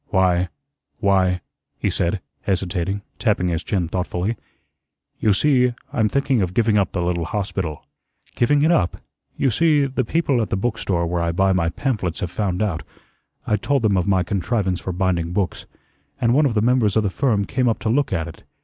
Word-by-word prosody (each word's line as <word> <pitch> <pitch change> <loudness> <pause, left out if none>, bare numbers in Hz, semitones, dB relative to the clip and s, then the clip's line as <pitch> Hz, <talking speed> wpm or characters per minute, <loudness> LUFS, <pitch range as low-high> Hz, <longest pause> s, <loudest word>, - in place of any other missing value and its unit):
"Why 90 -2 +2 0.5
why," 95 -3 +2 0.4
he - - 0
said, 90 +3 -1 0.2
hesitating, 95 0 -1 0.2
tapping 100 -6 +1
his 85 -1 -2
chin 90 -4 -1
thoughtfully. 90 +4 -2 0.8
"You 105 - +3
see 125 +2 +3 0.2
I'm 110 -2 +2
thinking 135 -3 +1
of 90 0 -2
giving 110 -2 +3
up 100 -3 +2
the 90 - -1
little 85 -1 -1
hospital." 95 -4 -3 0.5
"Giving 145 +4 +2
it 160 - +4
up?" 90 - +2 0.4
"You 135 - +2
see, 150 +3 +3
the 130 -1 -1
people 140 -1 +1
at 110 - -2
the - - 0
book 110 +3 -1
store 85 -3 0
where 85 +1 -1
I 85 0 0
buy 95 +3 +2
my 85 -3 +1
pamphlets 100 - -2
have 90 - -3
found 95 -1 -1
out 90 -7 -1 0.6
I 105 - +1
told 140 +4 0
them 105 -3 +3
of 90 0 +1
my 95 -2 +3
contrivance 95 0 -1
for 95 - -4
binding 90 -2 0
books, 95 -1 -2 0.5
and 115 0 +2
one 145 +2 +4
of 120 - -2
the 105 - +3
members 120 -4 +3
of 110 - +3
the 100 - 0
firm 110 -4 +1
came 130 0 +1
up 115 - 0
to - - -1
look 140 +4 +1
at 85 -3 -1
it. 85 - -11
100 Hz, 195 wpm, -22 LUFS, 90-120 Hz, 0.8 s, it